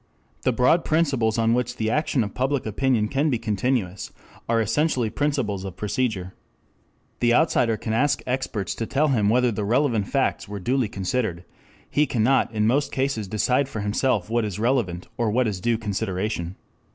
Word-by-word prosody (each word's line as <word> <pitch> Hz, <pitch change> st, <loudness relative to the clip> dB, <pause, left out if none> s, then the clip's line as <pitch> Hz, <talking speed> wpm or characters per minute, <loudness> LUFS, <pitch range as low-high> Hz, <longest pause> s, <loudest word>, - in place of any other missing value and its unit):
The 130 Hz, -, +2 dB
broad 125 Hz, +8 st, +3 dB
principles 135 Hz, -9 st, +1 dB
on 115 Hz, 0 st, +3 dB
which 125 Hz, 0 st, -1 dB
the 110 Hz, -1 st, -1 dB
action 145 Hz, -2 st, +1 dB
of 100 Hz, -, -6 dB
public 130 Hz, +2 st, -1 dB
opinion 110 Hz, 0 st, +1 dB
can 140 Hz, +6 st, +1 dB
be 125 Hz, -, +1 dB
continuous 105 Hz, -3 st, -2 dB, 0.4 s
are 115 Hz, 0 st, +3 dB
essentially 115 Hz, +1 st, +1 dB
principles 130 Hz, -9 st, -1 dB
of 95 Hz, -2 st, -7 dB
procedure. 105 Hz, -5 st, -2 dB, 0.9 s
The 120 Hz, 0 st, +3 dB
outsider 115 Hz, -8 st, +2 dB
can 110 Hz, +1 st, -3 dB
ask 140 Hz, +6 st, +1 dB
experts 125 Hz, -7 st, -2 dB
to 115 Hz, -, -4 dB
tell 150 Hz, +2 st, +1 dB
him 110 Hz, -6 st, +2 dB
whether 125 Hz, +2 st, +3 dB
the 105 Hz, -1 st, -3 dB
relevant 115 Hz, -2 st, +1 dB
facts 135 Hz, -5 st, 0 dB
were 100 Hz, 0 st, -6 dB
duly 125 Hz, +3 st, 0 dB
considered; 95 Hz, -2 st, -2 dB, 0.4 s
he 150 Hz, 0 st, +1 dB
cannot 130 Hz, 0 st, +2 dB
in 105 Hz, -1 st, 0 dB
most 135 Hz, +6 st, +1 dB
cases 130 Hz, -6 st, -1 dB
decide 125 Hz, +7 st, +1 dB
for 110 Hz, -, -4 dB
himself 105 Hz, 0 st, 0 dB
what 115 Hz, +1 st, 0 dB
is 105 Hz, -4 st, -3 dB
relevant 110 Hz, -7 st, 0 dB
or 115 Hz, -2 st, +2 dB
what 125 Hz, +4 st, +2 dB
is 95 Hz, -4 st, -3 dB
due 115 Hz, +2 st, +1 dB
consideration. 100 Hz, -3 st, -3 dB
115 Hz, 175 wpm, -24 LUFS, 105-130 Hz, 0.9 s, broad